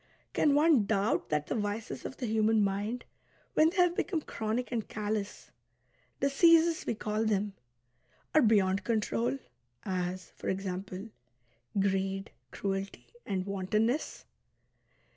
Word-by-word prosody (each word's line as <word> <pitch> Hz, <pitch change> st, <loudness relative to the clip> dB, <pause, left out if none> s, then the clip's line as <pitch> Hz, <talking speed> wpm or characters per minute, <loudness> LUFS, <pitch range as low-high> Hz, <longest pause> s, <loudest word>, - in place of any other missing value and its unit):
Can 290 Hz, -2 st, +3 dB
one 295 Hz, -7 st, +5 dB
doubt 205 Hz, -1 st, +1 dB
that 150 Hz, -1 st, 0 dB
the -, -, -3 dB
vices 210 Hz, 0 st, -3 dB
of 265 Hz, -, -6 dB
the 255 Hz, -, -3 dB
human 220 Hz, -1 st, +3 dB
mind, 205 Hz, +5 st, -2 dB, 0.5 s
when 315 Hz, +1 st, +5 dB
they 375 Hz, -, -8 dB
have 355 Hz, -1 st, +4 dB
become 340 Hz, -4 st, -1 dB
chronic 225 Hz, 0 st, -3 dB
and 230 Hz, -3 st, -2 dB
callous 210 Hz, -1 st, -4 dB, 0.3 s
(" -, -, -39 dB
diseases 330 Hz, +4 st, +5 dB
" -, -, -20 dB
we -, -, 0 dB
call 215 Hz, +1 st, -1 dB
tliem), 205 Hz, -1 st, +1 dB, 0.8 s
are 310 Hz, -, +6 dB
beyond 200 Hz, -4 st, +3 dB
control, 135 Hz, -, 0 dB, 0.5 s
as, 185 Hz, -1 st, -3 dB
for -, -, -5 dB
example, 190 Hz, +2 st, -4 dB, 0.7 s
greed, 195 Hz, 0 st, 0 dB, 0.2 s
cruelty, 195 Hz, +4 st, -4 dB, 0.2 s
and 190 Hz, -2 st, -1 dB
wantonness? 210 Hz, +7 st, -1 dB
210 Hz, 130 wpm, -31 LUFS, 195-240 Hz, 0.8 s, are